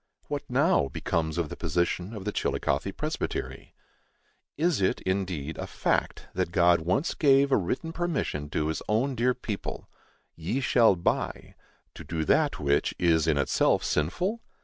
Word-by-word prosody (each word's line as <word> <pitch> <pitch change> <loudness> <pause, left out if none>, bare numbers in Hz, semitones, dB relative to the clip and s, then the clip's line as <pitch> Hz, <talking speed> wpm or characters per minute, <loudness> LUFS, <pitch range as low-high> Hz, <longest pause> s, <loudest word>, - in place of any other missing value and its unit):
What, - - -4
now, 70 - +3
becomes 80 +4 -2
of 85 -3 -1
the - - -6
position 90 +4 -1
of 100 -2 -7
the 105 - -1
Chillicothe 70 -7 -1
Presbytery? - - -4 0.8
Is 160 - +1
it, 95 - +1
indeed, 90 -6 -2
a - - -4
fact, - - -1
that 90 -1 -1
God 85 -1 +4
once 95 - 0
gave 140 -1 +4
a - - +6
written 130 - -2
permission 155 - -2
to 75 +1 -1
his 80 - -2
own 120 +6 +1
dear 125 +1 +1
people 110 -5 -5 0.5
["ye 85 +11 -2
shall 120 -6 +4
buy"] 85 - -2 0.4
to - - -10
do 80 -2 -3
that - - +2
which 70 0 +1
is 80 -2 +3
in 80 -3 +3
itself 70 - +2
sinful? 180 - -1
90 Hz, 155 wpm, -27 LUFS, 80-125 Hz, 0.8 s, a